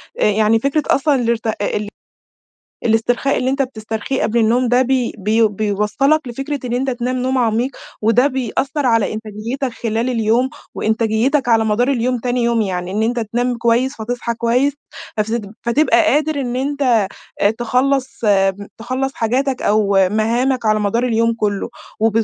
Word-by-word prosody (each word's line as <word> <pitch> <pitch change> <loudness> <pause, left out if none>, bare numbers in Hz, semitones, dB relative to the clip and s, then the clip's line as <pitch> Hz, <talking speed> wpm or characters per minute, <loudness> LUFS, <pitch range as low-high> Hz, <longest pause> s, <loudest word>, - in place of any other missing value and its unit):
يعني 215 +1 +2
فكرة 280 +4 0
أصلًا 285 +1 +2
الارت 235 -2 0
ال 205 0 -2 1.0
الإسترخاء 240 +4 +1
اللي 255 - 0
إنت 275 +1 +1
بتسترخيه 225 +1 -3
قبل 235 +2 +1
النوم 240 +3 +2
ده، 250 +2 +4
بي 255 -1 0
بي 220 +2 +2
بيوصّلك 215 +8 0
لفكرة 275 +4 -4
إن 245 - -3
إنت 265 +2 0
تنام 250 +1 -2
نوم 260 +1 0
عميق، 235 +2 +1 0.3
وده 230 +5 +4
بيأثّر 265 +2 -1
على 230 -3 +2
إنتاجيتك 220 +5 -4
خلال 230 +2 0
اليوم، 230 +2 +1 0.3
وإنتاجيتك 225 +5 +1
على 225 -1 +4
مدار 220 +4 +1
اليوم 250 -1 0
تاني 245 +1 -1
يوم، 235 -1 +1
يعني 180 -2 -3
إن 210 +3 -1
إنت 235 +1 0
تنام 240 +3 -1
كويس، 240 +4 +1
فتصحى 235 +1 -3
كويس، 245 +5 +1 0.4
فسدب 215 -1 -2
فتبقى 295 +7 +3
قادر 305 -1 +1
إن 245 -1 -3
إنت 260 -6 +1 0.5
تخلّص 255 +3 0
م 195 0 +2
تخلّص 255 +4 -2
حاجاتك 255 +3 -1
أو 200 -3 +3
مهَامك 235 +3 0
على 215 0 +3
مدار 230 +4 0
اليوم 230 -1 +2
كُلّه 205 0 -1 0.3
و 225 +1 +3
235 Hz, 150 wpm, -18 LUFS, 220-260 Hz, 1.0 s, ده